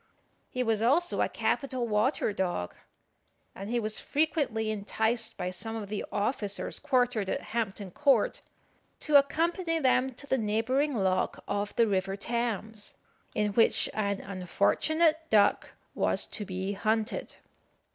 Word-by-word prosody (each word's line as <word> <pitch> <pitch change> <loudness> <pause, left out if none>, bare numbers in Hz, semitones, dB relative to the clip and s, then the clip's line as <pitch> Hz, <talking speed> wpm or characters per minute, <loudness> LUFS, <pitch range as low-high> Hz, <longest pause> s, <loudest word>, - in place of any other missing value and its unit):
He 255 - -1
was 225 -2 +1
also 305 +10 +3
a - - +1
capital 260 -4 -1
water 215 +1 +1
dog; 175 - -2 0.8
and 195 +2 -7
he 240 +1 +1
was 215 -1 -2
frequently 280 -8 0
enticed 220 +2 -1
by 180 0 -3
some 200 +5 -5
of 210 -3 -5
the 210 -1 -3
officers 205 -1 -2
quartered 245 -8 +1
at - - 0
Hampton 205 -4 -2
Court 270 - +2 0.6
to 300 -2 +6
accompany 330 +4 +1
them 260 -3 +2
to 285 - -9
the 265 -2 0
neighbouring 230 +7 +1
lock 190 -3 0
of 205 0 -2
the 230 - +4
river 195 -2 0
Thames, 220 -1 -3 0.4
in 210 -1 0
which 225 +2 +4
an 200 -2 -1
unfortunate 305 - +1
duck 205 -2 +3 0.2
was - - 0
to 210 - -5
be 190 +1 -3
hunted. 215 +3 -1
220 Hz, 135 wpm, -29 LUFS, 200-260 Hz, 0.8 s, to